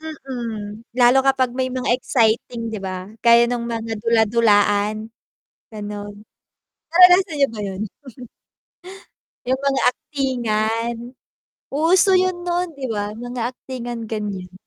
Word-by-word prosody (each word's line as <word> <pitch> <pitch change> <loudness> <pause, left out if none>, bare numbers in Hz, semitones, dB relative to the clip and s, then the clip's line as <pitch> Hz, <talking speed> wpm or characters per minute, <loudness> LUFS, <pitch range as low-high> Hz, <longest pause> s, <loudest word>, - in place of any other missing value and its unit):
Mm. 235 -8 -7
Lalo 245 +1 +5
kapag 265 -2 +2
may 260 - +1
mga 255 -1 -1
exciting 230 -2 0
'di 220 - -4
ba? 185 0 -6
Gaya 235 0 +5
nung 240 -1 -2
mga 225 -1 -4
dula-dulaan 215 -1 +2 0.6
gano'n. 205 -1 -7 0.8
Naranasan 360 -1 +6
niyo 275 - +5
ba - - -7
'yun? 195 -1 -5 1.7
Yung 260 +1 +1
mga 275 -1 +1
aktingan, 235 -4 -1 0.8
uso 340 +7 +4
yun 365 -1 -1
noon 350 -1 -1
'di 270 -2 -4
ba? 205 0 -3
Mga 245 +1 -6 0.2
aktingan 240 -3 -6
ganyan. 200 -4 -5
235 Hz, 115 wpm, -21 LUFS, 215-265 Hz, 1.7 s, Naranasan